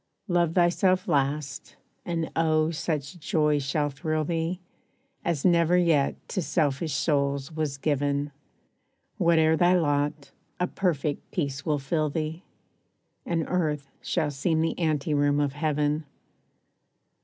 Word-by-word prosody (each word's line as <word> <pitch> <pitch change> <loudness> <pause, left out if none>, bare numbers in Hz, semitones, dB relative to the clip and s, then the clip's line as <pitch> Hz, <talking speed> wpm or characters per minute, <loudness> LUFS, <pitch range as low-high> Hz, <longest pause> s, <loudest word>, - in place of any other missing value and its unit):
Love 175 -3 +1
thyself 185 +1 +3
last; 140 -2 -1 0.3
and 165 -2 -2
oh, 155 -1 +2
such 155 0 -3
joy 150 -1 +1
shall 145 +2 -1
thrill 155 +2 -1
thee, 165 +2 -2 0.6
As 165 -5 -1
never 170 -1 +4
yet 165 -6 +3
to 190 - -1
selfish 155 -2 0
souls 140 0 0
was 155 -3 -2
given. 145 0 0 0.9
Whate'er 160 -1 +4
thy 175 +2 +4
lot, 145 -3 0 0.3
a 180 - +2
perfect 160 -6 -2
peace 145 -4 -3
will 150 -1 +2
fill 150 +2 -1
thee, 155 +2 -3 0.9
And 165 -2 0
earth 150 -6 -1
shall 155 -4 -1
seem 160 +4 0
the 165 +2 -1
ante 155 -2 0
room 145 0 +2
of 145 -2 0
Heaven. 150 0 0
155 Hz, 125 wpm, -27 LUFS, 145-170 Hz, 0.9 s, never